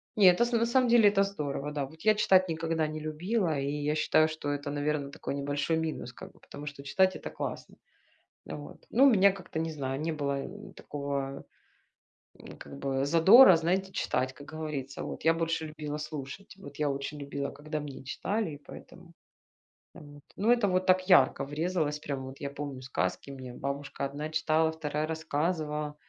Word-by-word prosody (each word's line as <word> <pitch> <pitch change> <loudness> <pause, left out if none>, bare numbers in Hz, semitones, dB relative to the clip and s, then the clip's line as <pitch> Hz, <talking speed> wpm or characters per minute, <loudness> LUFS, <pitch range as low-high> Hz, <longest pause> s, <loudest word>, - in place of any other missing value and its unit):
Не 205 -3 +6
эт 180 - +3
с 240 0 +2
на 230 -1 +2
самом 245 +1 +3
деле 230 -3 +7
это 200 -1 +3
здорово, 150 -7 -3
да. 145 -2 -2
Вот 160 +4 -15
я 215 0 +4
читать 185 -3 +4
никогда 165 -1 -1
не 155 0 -5
любила, 160 +3 -1
и 140 +1 -1
я 150 +1 -1
считаю, 155 0 +3
что 155 -2 -4
это, 145 0 -3
наверно, 145 -1 -1
такой - - -5
небольшой 145 +3 -1
минус, 160 -6 -3
как - - -11
бы - - -23
потому 145 +1 -10
что 145 -1 -7
читать 185 +6 +2
это - - -6
классно. - - -6 0.7
Вот. 145 0 -9
Ну 255 +4 +5
у - - +8
меня 200 -3 +5
как-то, 180 -4 -7
не 165 0 -2
знаю, 135 -2 -3
не 165 +1 -1
было 140 -2 -2
н 205 +2 -10
такого, 140 -1 -4 0.9
ну, - - -12
как 70 -1 -10
бы 135 - -1
задора, 180 - +8
знаете, 185 +4 0
читать, 130 +1 -1
как 145 - -13
говорится. 150 -4 -5
Вот. - - -6
Я 165 - +6
больше 165 -1 -1
любила 150 -1 -5
слушать, 150 +5 -7
вот, 145 -8 -11
я 150 -1 +1
очень 140 +2 -4
любила, 140 0 -4
когда 155 +1 -5
мне 145 -3 -8
читали 200 +7 -2
и 145 - -8
поэтому. 170 +4 -13 0.8
Вот, 145 -1 -13
ну 215 +4 +2
это 205 -7 +3
так 185 0 +2
ярко 135 -6 +5
врезалось, 155 +1 -1
прям 140 -3 -4
вот. 130 +1 -10
Я 140 - -4
помню 140 -2 -6
сказки, 135 +1 -3
мне 130 -2 -8
бабушка 140 +2 -4
одна 145 +3 -4
читала, 160 0 +2
вторая 155 -1 -3
рассказывала. 155 -1 -2
150 Hz, 185 wpm, -29 LUFS, 140-175 Hz, 0.9 s, у